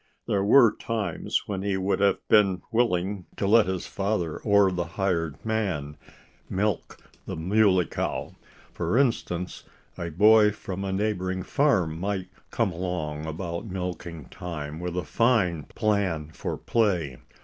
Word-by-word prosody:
There 100 -1 +1
were 115 +1 +6
times 105 -7 -2
when 95 -2 -3
he 100 -1 0
would 95 +1 0
have 100 0 +1
been 100 -4 +4
willing 100 -5 0
to - - -1
let 110 +1 +5
his 95 -1 -2
father, 95 -5 -2
or 100 -2 +4
the 90 -1 -2
hired 85 -6 0
man, 95 -10 -1 0.5
milk 100 0 -1 0.3
the - - -4
Muley 95 +2 +3
Cow. - - -3 0.4
For 115 - 0
instance, 95 -9 0 0.4
a 85 - -3
boy 105 +5 +6
from 95 -2 -6
a 95 - -2
neighboring 95 -2 -1
farm 95 - +1
might 95 0 -2 0.2
come - - 0
along 85 -4 -3
about 85 +4 -4
milking 90 -5 -5
time 75 -3 -6
with 90 0 -4
a 90 - 0
fine 95 - +1
plan 95 -8 -1
for - - -4
play. 90 - 0
95 Hz, 140 wpm, -26 LUFS, 85-105 Hz, 0.5 s, were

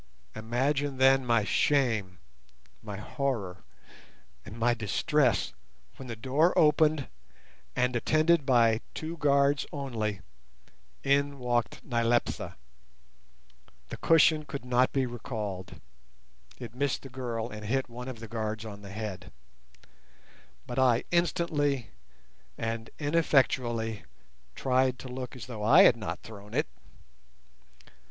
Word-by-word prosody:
Imagine 135 +5 -1
then 135 0 +5
my 115 -3 +2
shame—my 95 - -2
horror, 105 - -3 0.8
and 105 +2 -10
my 120 +1 +2
distress—when 100 - -1
the 115 - -5
door 135 +10 +1
opened, 150 -2 +4 0.7
and, 125 -1 +1
attended 155 +5 +3
by 115 -4 +3
two 160 +1 -5
guards 140 -2 +2
only, 115 -8 -3 0.8
in 140 +1 +2
walked 120 -2 -1
Nyleptha. 120 -1 0 1.3
The - - -6
cushion 160 -1 +4
could 140 -3 -7
not 125 +1 +2
be 135 -1 +1
recalled 105 -6 -6 0.8
(it 120 - -8
missed 140 +2 -1
the 135 - -9
girl 120 -3 -4
and 105 0 -8
hit 135 +3 0
one 125 +1 -8
of 130 -3 -6
the 115 - -8
guards 110 0 -4
on 100 -2 -8
the 100 - -10
head), 100 -3 -6 1.3
but 125 +1 -3
I 125 -2 +4
instantly 155 -6 0 0.7
and 115 0 -3
ineffectually 130 -8 +1 0.5
tried 130 -1 +1
to 130 - -9
look 125 0 -6
as 125 - -8
though 115 -4 -7
I 150 - +7
had 120 - +7
not 95 -7 -5
thrown 105 -1 -10
it. - - +2
125 Hz, 115 wpm, -29 LUFS, 110-140 Hz, 1.3 s, I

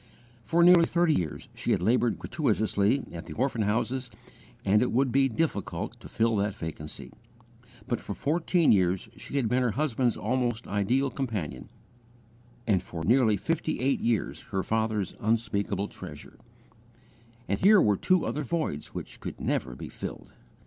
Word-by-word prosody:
For 170 +6 +3
nearly 175 -1 +7
thirty 170 -2 +3
years 85 - -2
she - - -4
had - - 0
laboured 120 0 +2
gratuitously 110 -3 +1
at 85 0 -8
the 80 - -7
orphan 125 -2 0
houses 120 +5 -1 0.6
and 100 +2 +4
it 125 - +1
would 130 +1 +1
he 135 -1 +5
difficult 120 - -2
to - - -11
fill 115 0 +1
that 100 0 0
vacancy; 75 -3 -7 0.8
but - - -1
for - - -5
fourteen 165 +2 +2
years 95 -2 +2
she - - -8
had 130 -5 +1
been 125 +3 +2
her 120 -4 +1
husband's 125 -3 0
almost 120 -3 -1
ideal 125 +7 +1
companion, 115 - -4 1.0
and 100 -6 +2
for 85 -3 -7
nearly 115 0 +4
fifty 160 - -1
eight 135 +2 +1
years 115 -3 -1
her 95 -2 -1
father's 110 -3 -1
unspeakable 105 -2 0
treasure - - -10 1.1
and - - 0
here 205 +2 +7
were 105 - +4
two 185 - +2
other 150 - -2
voids 145 - -3
which - - -7
could - - -7
never 60 -1 -1
be - - -7
filled. - - -7
115 Hz, 155 wpm, -28 LUFS, 100-135 Hz, 1.1 s, nearly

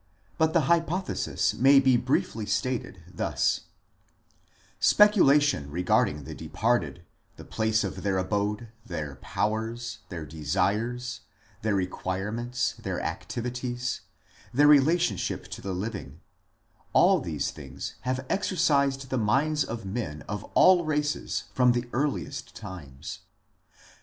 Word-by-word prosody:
But 160 0 +3
the 170 - +4
hypothesis 170 +4 0
may 135 +2 +6
be 130 -2 +4
briefly 115 -3 0
stated 120 -8 -2
thus: 90 -1 -1 1.1
Speculation 145 - +5
regarding 75 -3 +1
the - - -7
departed, 115 -6 -1 0.3
the - - -12
place 110 -1 +1
of 95 - -4
their 100 -2 0
abode, 105 +4 -1
their 75 -7 -5
powers, 115 - -2
their 85 -4 -6
desires, 105 - -1 0.4
their 110 -1 +1
requirements, 105 +6 -2
their - - -3
activities, 125 0 -3 0.5
their 145 +4 +4
relationship 150 +4 +3
to - - -7
the 95 - -4
living 95 - -5 0.7
all - - +5
these - - -2
things - - -7
have 130 +1 -2
exercised 140 -8 +1
the 130 - +1
minds 140 +8 +2
of 115 -1 -6
men 95 -8 -4
of 105 +1 -5
all 185 -2 +6
races 150 -1 -1
from 125 -1 +4
the 120 0 -2
earliest 140 0 -2
times. 85 -11 -8
120 Hz, 115 wpm, -27 LUFS, 100-140 Hz, 1.1 s, may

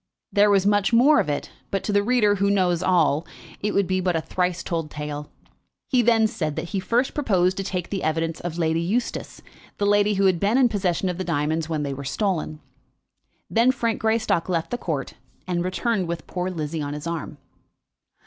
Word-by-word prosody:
There 205 +1 +5
was 200 -1 +3
much 205 0 +3
more 255 +6 +6
of - - 0
it; 145 - -3 0.2
but 195 - -2
to 210 - -2
the 205 - +4
reader, 210 -2 +3
who 200 +1 +2
knows 180 -4 +2
it - - -1
all, 160 -4 +3 0.4
it 210 - -1
would 200 - +3
be 185 +1 0
but 180 -1 0
a 165 - +1
thrice 180 +1 -1
told 165 -3 -3
tale. 150 0 -6 0.6
He 255 -3 +4
then 230 -1 +4
said 180 -10 -2
that 170 - -4
he 195 - -1
first 235 +7 0
proposed 190 -10 +2
to 195 - -2
take 185 -2 -4
the 195 -2 -2
evidence 165 +1 -1
of 175 -1 -5
Lady 165 -1 +1
Eustace, 220 +8 -3 0.3
the 205 - 0
lady 205 0 +3
who 195 0 +2
had 185 -3 +3
been 205 +6 +2
in 255 -2 +5
possession 190 -3 0
of 180 0 -3
the - - -1
diamonds 160 -1 -1
when 155 -2 -1
they 140 -1 -3
were 140 +1 -7
stolen. 155 -1 -2 0.9
Then 235 +3 +3
Frank 235 -3 -2
Greystock 220 -6 +1
left 165 -3 -1
the 245 - -1
court, 150 -9 -3 0.3
and 175 -1 -1
returned 190 +1 -1
with 170 -1 -4
poor 180 0 -3
Lizzie 160 -2 -3
on 145 0 -4
his 150 +1 -7
arm. 170 -3 -4
185 Hz, 210 wpm, -24 LUFS, 165-205 Hz, 0.9 s, more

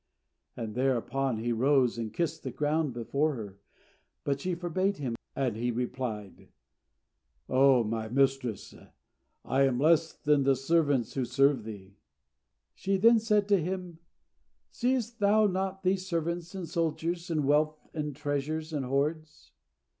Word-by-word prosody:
And 115 -3 -4
thereupon 130 0 0
he 120 +2 -2
arose 130 +1 +3
and 110 -2 -3
kissed 160 +1 -2
the 135 - -4
ground 150 +3 0
before 140 +6 -1
her; 100 -4 -8 0.6
but 140 -1 -1
she 180 +2 -1
forbade 185 +3 -1
him; 130 -5 -3 0.2
and 130 -5 0
he 120 +2 -1
replied, 120 -4 -4 1.0
"O 130 -1 +5
my 110 0 -3
mistress, 135 -4 0 0.7
I 135 - +1
am 130 -3 +3
less 160 +2 +4
than 150 -1 +1
the 135 0 +3
servants 140 -3 +1
who 135 - -1
serve 130 -1 +2
thee." 100 -2 -10 0.8
She 195 0 -1
then 230 +4 +6
said 210 -2 +2
to 200 -3 +4
him, 180 -1 -4 0.7
"Seest 245 -2 -1
thou 210 +1 +4
not 190 0 -1
these 185 0 0
servants 170 +1 -2
and 185 -3 -5
soldiers 170 +1 -2
and 155 -4 0
wealth 155 +2 +2 0.2
and 150 -3 -3
treasures 150 +2 -3
and 145 -3 -1
hoards?" 150 +3 -2
145 Hz, 140 wpm, -29 LUFS, 125-170 Hz, 1.0 s, then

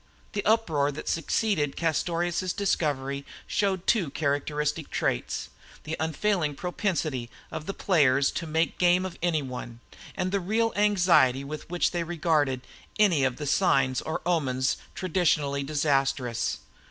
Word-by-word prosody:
The 205 - -1
uproar 165 -11 +2
that 155 - -7
succeeded 165 -3 0
upon - - -7
Castorious's 175 +3 -1
discovery 140 -8 -1 0.2
showed 195 -3 0
two 190 -10 +2
characteristic 150 +1 -1
traits - - -2 0.3
the 155 +1 -3
unfailing 160 -1 0
propensity 160 - -2 0.2
of 155 - -6
the 195 - -2
players 140 -7 +3
to 165 - -4
make 160 +1 0
game 180 +1 +4
of 180 -2 -7
any 165 -4 +1
one, 125 -2 -7 0.4
and 185 0 -1
the 200 - +1
real 220 +5 0
anxiety 180 -11 +4
with 150 +3 -7
which 175 0 +1
they 175 - -1
regarded 155 -6 +1 0.4
any 185 -10 +4
of 130 -2 +1
the 150 - -5
signs 135 -5 +2
or 160 - -4
omens 135 -7 +1 0.2
traditionally 155 -6 +1
disastrous. 135 -4 0
155 Hz, 140 wpm, -27 LUFS, 140-180 Hz, 0.4 s, game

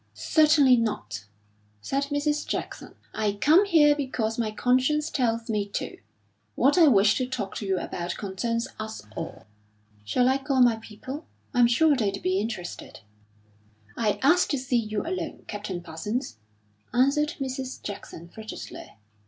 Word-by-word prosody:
"Certainly 300 -5 +5
not!" 110 - -3 0.5
said 275 - -1
Mrs. 295 +1 -1
Jackson. - - -5 0.2
"I 210 -2 0
come 310 - +5
here 300 -6 +5
because 240 -6 -2
my 225 -2 0
conscience 260 +7 +1
tells 230 -3 0
me 210 -3 -1
to. - - -4 0.6
What 275 - +4
I 340 -3 +7
wish 210 -4 +5
to 255 - -1
talk 225 -7 -4
to 205 - -5
you 190 -1 +1
about 175 0 -4
concerns 230 +5 -2
us 220 - -6
all." - - -6 0.6
"Shall 245 - +2
I 265 +1 +3
call 270 -1 0
my 235 -2 +4
people? 255 +7 -9 0.3
I'm 245 -2 +5
sure 295 +6 +4
they'd 200 -5 -1
be 185 +1 +1
interested." 200 -5 -6 0.9
"I 215 -3 0
asked 335 +6 +4
to 285 - +1
see 255 -1 0
you 215 -2 -3
alone, 365 +3 -4
Captain 205 -4 -5
Parsons," 190 - -4 0.5
answered 285 +5 +2
Mrs. 260 -1 -4
Jackson, 185 -4 -8
frigidly. 220 +5 -9
240 Hz, 145 wpm, -26 LUFS, 210-280 Hz, 0.9 s, I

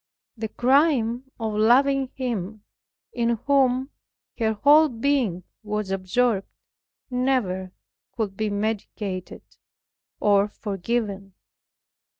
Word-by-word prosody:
The 220 -1 -4
crime 260 -1 +2
of 220 -2 -2
loving 265 +5 +3
Him 215 -5 -4 0.5
in 235 -1 0
whom 265 -1 +2 0.5
her 220 -1 +1
whole 295 +8 +5
being 235 -7 0 0.2
was 210 -2 -3
absorbed, 195 +2 0 0.6
never 245 -8 0 0.5
could 210 -4 -2
be 215 +1 -1
mitigated, 205 -2 -4 0.8
or 200 -1 +3
forgiven. 200 -1 -3
225 Hz, 90 wpm, -24 LUFS, 200-255 Hz, 0.8 s, whole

